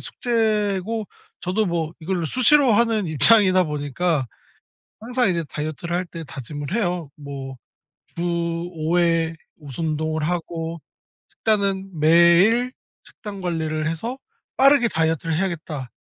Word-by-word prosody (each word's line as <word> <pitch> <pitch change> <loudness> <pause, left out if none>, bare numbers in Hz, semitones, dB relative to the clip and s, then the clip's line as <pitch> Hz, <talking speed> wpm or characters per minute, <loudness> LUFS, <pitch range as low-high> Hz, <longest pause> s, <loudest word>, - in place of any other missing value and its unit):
숙제고 215 -2 -1 0.3
저도 190 +4 0
뭐 165 -2 -2
이거를 170 0 -2
수시로 255 - +5
하는 220 -3 +2
입장이다 185 +4 +5
보니까 145 0 -1 0.7
항상 245 -1 +1
이제 170 -2 -1
다이어트를 155 +3 -4
할 180 0 -2
때 165 -1 -8
다짐을 145 - -6
해요. 175 -8 -2
뭐 135 -2 -7 0.6
주 170 - -2 0.5
5 160 +2 -1
회 165 -1 +2 0.2
무슨 150 +1 -6
운동을 155 0 -2
하고 165 -2 -4 0.5
식단은 195 -5 -1
매일 170 +10 +5 0.3
식단 200 -2 -10
관리를 160 -3 -2
해서 230 +11 -4 0.4
'빠르게 275 -2 +5
다이어트를 160 -1 0
해야겠다.' 160 -7 -3
170 Hz, 265 characters per minute, -22 LUFS, 155-205 Hz, 0.7 s, 수시로